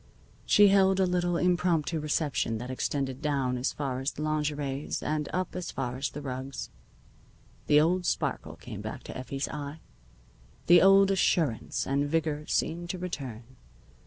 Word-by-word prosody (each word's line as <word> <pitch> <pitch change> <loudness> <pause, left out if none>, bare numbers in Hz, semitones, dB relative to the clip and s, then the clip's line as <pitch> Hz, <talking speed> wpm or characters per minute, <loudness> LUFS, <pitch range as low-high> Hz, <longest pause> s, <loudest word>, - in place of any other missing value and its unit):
She 205 -1 +7
held 195 -1 +4
a 190 - +4
little 175 -1 0
impromptu 175 -3 +1
reception 150 -6 -1
that 125 +3 -6
extended 135 0 -2
down 140 -4 0
as 125 +2 -1
far 135 -3 -3
as 135 +1 -1
the 150 - -5
lingeries 150 -2 -2
and 150 -1 -1
up 185 0 -2
as 180 -1 -4
far 125 -2 -3
as 135 +2 -2
the 145 - -8
rugs. 130 0 -5 1.0
The 150 0 +6
old 175 +3 +2
sparkle - - -2
came - - -8
back - - -6
to - - -8
Effie's 135 +2 -4
eye. 145 +1 -6 0.9
The 175 0 +7
old 195 +1 +6
assurance 165 -9 +1
and 140 +1 0
vigor 155 -1 -1
seemed 170 +1 -1
to 185 - -3
return. 135 -10 -5
150 Hz, 160 wpm, -28 LUFS, 135-175 Hz, 1.0 s, She